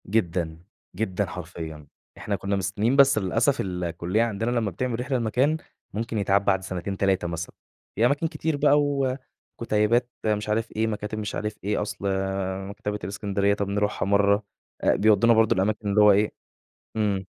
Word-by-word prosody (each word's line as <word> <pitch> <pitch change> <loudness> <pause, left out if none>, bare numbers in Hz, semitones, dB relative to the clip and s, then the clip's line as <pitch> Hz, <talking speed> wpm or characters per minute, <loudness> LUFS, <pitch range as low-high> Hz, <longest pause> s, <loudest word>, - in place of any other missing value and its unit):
جدًا، 85 -5 0 0.4
جدًا 100 0 -1
حرفيًا، 80 -4 -8 0.3
إحنا 100 - -2
كنا 100 +1 -2
مستنين 100 +6 0
بس 140 -3 +6
للأسف 115 +8 +1
الكُليّة 90 +3 -1
عندنا 115 +1 -1
لمّا 115 -4 0
بتعمل 120 +5 -2
رحلة 130 +1 -1
لمكان، 125 +7 +1 0.4
ممكن 115 +1 -3
يتعاد 100 -1 +2
بعد 95 -2 +2
سنتين 95 +1 -4
3 95 -3 +1
مثلًا، 85 +1 -5 0.4
في 110 - +3
أماكن 145 +6 +2
كتير 155 -1 -2
بقى 145 0 +4
و 140 -3 0 0.4
وكُتَيبات 115 +2 +2 0.2
مش 105 0 0
عارف 110 +2 0
إيه، 110 +1 +1
مكاتب 105 0 -4
مش 105 -1 -4
عارف 105 0 -3
إيه، 105 +1 0
أصل 105 - -4 0.7
مكتبة 105 0 -4
الإسكندرية 100 +1 0
طَب 100 -1 -2
نروحها 105 -1 0
مرّه 100 +1 +3 0.4
أ - - +3
بيودونا 110 +2 +5
برضه 110 -1 +4
الأماكن 105 +2 0
اللي 105 +1 +4
هو 105 0 +8
إيه 105 +2 +3 0.6
إمم. 100 -3 0
105 Hz, 160 wpm, -25 LUFS, 95-115 Hz, 0.7 s, هو